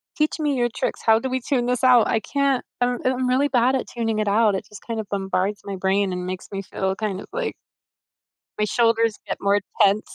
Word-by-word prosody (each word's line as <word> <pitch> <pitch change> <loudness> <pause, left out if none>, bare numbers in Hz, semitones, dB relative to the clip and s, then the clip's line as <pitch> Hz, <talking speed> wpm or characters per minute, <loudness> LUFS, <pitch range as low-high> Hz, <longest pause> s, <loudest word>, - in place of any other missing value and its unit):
Teach 305 +1 0
me 295 -3 0
your 240 -1 +1
tricks, - - -2
how 220 -1 +5
do 265 - -3
we 260 0 -1
tune 245 -2 0
this 250 +1 -1
out? 250 -3 +6
I 225 - +1
can't 275 +1 0 0.2
I - - +5
don't 245 0 -3
uh, - - +4
I'm 255 0 -1
really 265 +3 +3
bad 255 0 +2
at - - -1
tuning 225 -2 -2
it 215 - 0
out, 210 0 +3
it - - -4
just 210 - -12
kind 230 -1 -3
of 210 - -5
bombards 195 +1 -1
my 200 -1 -4
brain 190 0 +1
and 180 0 -4
makes 185 0 -5
me 195 0 -3
feel 190 0 -2
kind 200 -3 -3
of - - -11
like 480 0 -2 1.1
my 210 - +2
shoulders 230 0 +2
get - - -3
more 200 +1 +2 0.2
tense. 205 +1 +3
225 Hz, 245 wpm, -23 LUFS, 200-250 Hz, 1.1 s, out